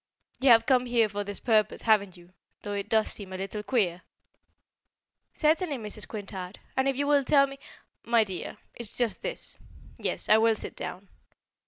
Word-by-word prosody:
You 265 - +4
have 230 -1 +7
come 250 -1 +3
here 235 -2 +3
for 205 0 -4
this 205 0 -2
purpose, 215 -3 +1
haven't 200 -5 +2
you, 175 +1 -18 0.3
though 205 - -4
it 200 -1 -4
does 220 -1 +2
seem 195 -3 -6
a - - -4
little 195 +2 -4
queer?" 200 -6 0 1.3
"Certainly, 310 -1 +1
Mrs. 215 -2 -5
Quintard; 195 -3 -7 0.2
and 265 +1 +2
if 270 - -2
you 285 - 0
will 285 -1 +3
tell 275 +1 +5
me 275 0 -10 0.3
" - - -53
"My 230 -1 +6
dear, 190 -4 -6 0.2
it's 235 -3 -5
just 240 -3 0
this - - -5 0.4
yes, - - -2
I 215 - +6
will 225 0 +4
sit - - -5
down. 195 +2 -6
220 Hz, 185 wpm, -28 LUFS, 200-255 Hz, 1.3 s, have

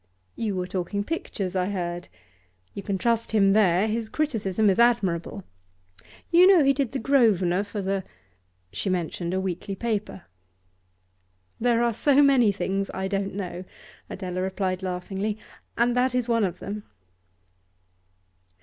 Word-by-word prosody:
'You 215 -4 -2
were 180 -1 -2
talking 185 +2 -3
pictures, 200 - -4
I 180 -1 +1
heard. 175 -3 -4 0.7
You 200 - -6
can 200 -1 -2
trust 230 +2 0
him 195 -2 +4
there; 200 -1 +3
his 220 0 -2
criticism 220 -9 0
is 195 +1 +3
admirable. 200 -5 +1 0.9
You 350 +2 +7
know 375 -5 +6
he 275 0 +4
did 270 -3 -1
the 270 - -2
Grosvenor 210 -9 +3
for 205 -1 -5
the 195 0 -1 0.3
?' 90 0 -43
She 145 - -2
mentioned 175 -1 -2
a 190 - 0
weekly 190 +1 -4
paper. 210 -3 -3 1.4
'There 235 0 +2
are 235 -1 +1
so 285 +5 +4
many 260 -6 +5
things 195 +1 -2
I 190 0 -2
don't 195 0 -2
know,' 180 -2 -5 0.5
Adela 185 -1 -4
replied 185 0 -2
laughingly, 190 +3 -3 0.4
'and 240 +1 +2
that 250 0 +1
is 250 -1 0
one 230 -3 +2
of 180 - -4
them. 210 +1 -6
200 Hz, 150 wpm, -25 LUFS, 185-235 Hz, 1.4 s, You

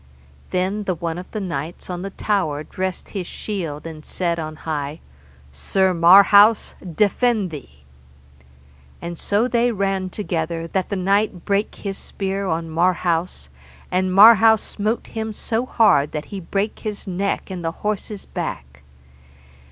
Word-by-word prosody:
Then 190 +3 -1
the 185 - 0
one 170 0 -4
of 185 - -10
the 215 - -4
knights 165 -4 -5
of 180 -1 -5
the 195 - -4
tower 185 -8 -1
dressed 185 +3 -4
his 190 -4 -5
shield, 165 -9 -5
and 160 -2 -8
said 170 0 -2
on 155 -1 -5
high, 150 -1 -4 0.5
Sir 185 - +1
Marhaus, 200 +5 +6 0.2
defend 210 -1 +2
thee. 70 - -11 1.2
And 170 -1 -7
so 210 +4 +1
they 245 -1 +2
ran 195 -3 -1
together 165 -4 -3
that 185 +2 -2
the 200 - -1
knight 195 -1 0
brake 200 +1 0
his 195 -1 -5
spear 195 0 -3
on 165 -1 -1
Marhaus, 170 - 0 0.4
and 185 +1 +1
Marhaus 220 +2 +7
smote 215 +3 -2
him 220 -1 -5
so 230 +3 -2
hard 180 - +3
that 150 0 -4
he 195 - -3
brake 195 +4 -2
his 210 -2 -5
neck 195 +1 -2
and 180 -2 -5
the 165 - -1
horse's 210 -1 -3
back. 65 0 -6
185 Hz, 145 wpm, -21 LUFS, 165-205 Hz, 1.2 s, Marhaus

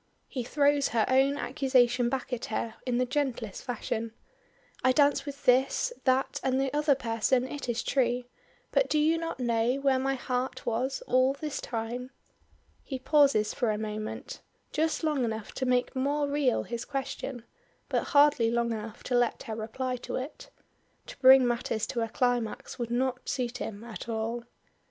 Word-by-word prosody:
He 255 - -4
throws 285 +2 +2
her 225 -1 +1
own 270 +2 +3
accusation 255 -5 +2
back 260 0 -3
at 240 - -2
her 225 +1 -3
in 245 -1 +1
the 255 - +2
gentlest 250 -6 -2
fashion. 230 -2 -3 0.7
"I 260 - +5
danced 290 +1 +3
with 280 0 -8
this, 265 - +3
that, 260 0 +2
and 265 0 +1
the 270 0 0
other 295 -1 +3
person 245 +1 +1
it 280 -2 -6
is 235 -1 -1
true, 245 -2 +1 0.5
but - - +2
do 305 - +2
you 315 +2 +3
not 330 -4 -4
know 235 0 +1
where 275 -1 +2
my 270 +1 0
heart 250 0 -3
was 250 +4 -1
all 255 +1 +3
this 295 +1 -5
time?" 240 +2 -4 0.7
He 265 - -4
pauses 275 -6 +3
for 240 - 0
a 210 - 0
moment, 215 0 -5 0.3
just 315 +2 0
long 300 -4 +1
enough 220 -2 -3
to 260 - -3
make 250 +1 +1
more 285 +2 0
real 280 -3 +1
his 235 -1 -5
question, 270 -3 -4 0.4
but - - 0
hardly 285 -5 +4
long 235 0 0
enough 220 0 -6
to 250 - -1
let 245 -1 +1
her 220 - -5
reply 250 +4 -3
to - - -6
it. 260 +4 -6 0.6
To - - -10
bring 260 -1 +8
matters 235 -2 -1
to 240 -1 -3
a 225 - -1
climax, 245 -1 -1
would 235 -1 -2
not 250 +1 -1
suit 250 -1 -2
him 210 0 -5
at 235 0 -8
all. 230 +1 -2
255 Hz, 175 wpm, -29 LUFS, 235-275 Hz, 0.7 s, bring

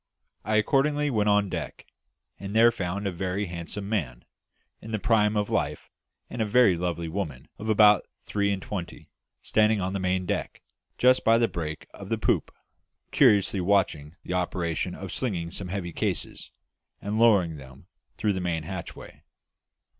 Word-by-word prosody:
I 110 - 0
accordingly 145 +6 +2
went 105 -3 +1
on 105 0 +3
deck, 85 -7 -6 0.5
and 100 +1 -6
there 115 +1 +6
found 100 -1 -4
a 100 - 0
very 95 +3 -2
handsome 90 +3 -6
man, 70 - -3 0.6
in 110 - -10
the 110 - -1
prime 110 -1 +2
of 105 0 -1
life, - - -2 0.4
and 120 - -5
a - - +4
very 110 -3 +5
lovely 85 -1 -3
woman 80 -7 -5
of 110 +1 -5
about 105 -2 +5
three 100 -1 -1
and 95 -1 -3
twenty, 90 -5 -7 0.3
standing 110 0 +3
on 95 0 -2
the 100 - -2
main 95 0 0
deck, - - -3 0.3
just 130 +1 +4
by 115 0 +5
the 115 0 +3
break 75 -5 -5
of - - -10
the - - 0
poop, - - 0 0.6
curiously 100 -1 +4
watching 90 -5 +1
the - - -4
operation 90 -1 -2
of 95 -2 -7
slinging 90 -10 -2
some 95 0 -5
heavy 90 -2 -4
cases, - - -3 0.5
and 105 +2 -3
lowering 100 -9 +4
them 65 -2 -13 0.3
through 105 -1 +1
the 95 - -3
main 85 -3 -2
hatchway. 95 +2 -8
100 Hz, 165 wpm, -26 LUFS, 85-105 Hz, 0.6 s, there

